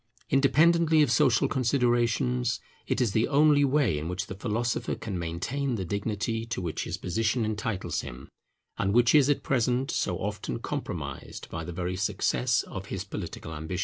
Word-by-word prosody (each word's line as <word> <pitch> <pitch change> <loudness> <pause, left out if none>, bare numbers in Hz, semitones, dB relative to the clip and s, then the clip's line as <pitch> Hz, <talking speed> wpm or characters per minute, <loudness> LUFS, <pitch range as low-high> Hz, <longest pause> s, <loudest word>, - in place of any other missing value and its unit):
Independently 160 +3 +4
of 135 - +1
social 115 0 +4
considerations, 125 -1 +1 0.3
it - - 0
is 120 -5 +2
the 110 +3 +2
only 145 0 +5
way 135 - +2
in 80 - -5
which 90 +3 -3
the - - -7
philosopher 115 +4 -2
can 100 -5 -5
maintain 105 +11 -2
the 95 -4 -3
dignity 105 +4 -2
to 115 -3 -4
which 85 -4 -3
his - - -4
position 110 +6 0
entitles 105 -2 -2
him, 65 +2 -9 0.5
and 100 +2 +1
which 120 -1 +5
is 145 -2 +6
at 145 - +1
present 125 0 +1
so - - -1
often 60 - -3
compromised - - -5
by 80 - -4
the 90 - -6
very 90 +1 -3
success 105 +5 +1
of 95 0 -7
his 95 -2 -4
political 90 -4 -6
ambition. 80 +4 -4
115 Hz, 170 wpm, -28 LUFS, 95-130 Hz, 0.5 s, is